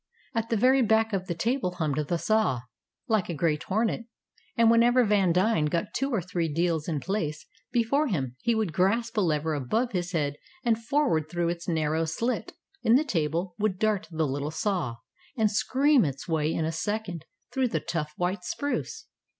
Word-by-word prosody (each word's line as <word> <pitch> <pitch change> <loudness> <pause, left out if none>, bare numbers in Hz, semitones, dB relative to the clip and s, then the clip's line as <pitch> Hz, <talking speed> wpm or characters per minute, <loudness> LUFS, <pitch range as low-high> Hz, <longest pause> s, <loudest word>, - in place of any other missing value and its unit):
At 230 0 -1
the 230 - +1
very 260 +5 +4
back 220 -1 +3
of 185 -1 -1
the 170 - -2
table 220 0 -1
hummed 150 -3 -1
the 175 - 0
saw, 190 - +1 0.5
like 215 -5 +1
a 170 - -2
great 155 -1 +1
hornet; 225 +3 -1 0.5
and 230 -1 +6
whenever 240 +2 +5
Vandine 190 -4 +3
got 170 +2 -2
two 270 +1 0
or 225 -9 0
three 170 -3 -2
deals 165 -1 0
in 160 -4 -1
place 155 -3 -3 0.3
before 250 +5 +2
him 135 - -2
he 235 - +2
would 215 -7 -1
grasp 225 +7 +1
a - - +4
lever 160 -3 +1
above 215 - 0
his 180 -2 -2
head, 145 -3 0 0.3
and 230 -2 +1
forward 230 - +1
through 175 0 0
its 170 0 -4
narrow 160 -1 +1
slit 230 +11 -2 0.3
in 225 - +4
the 285 - +4
table 170 - -1
would 205 -3 0
dart 210 -4 0
the 160 -2 0
little 140 +1 -2
saw, 160 - -1 0.4
and 215 -2 +3
scream 270 +5 +3
its 140 -1 -3
way 160 -2 +1
in 160 - -1
a 160 - -1
second 180 -1 -3 0.3
through 260 -1 +2
the 230 - -1
tough 150 -3 -3
white 180 +1 -1
spruce. 435 - -3
185 Hz, 185 wpm, -27 LUFS, 160-225 Hz, 0.5 s, and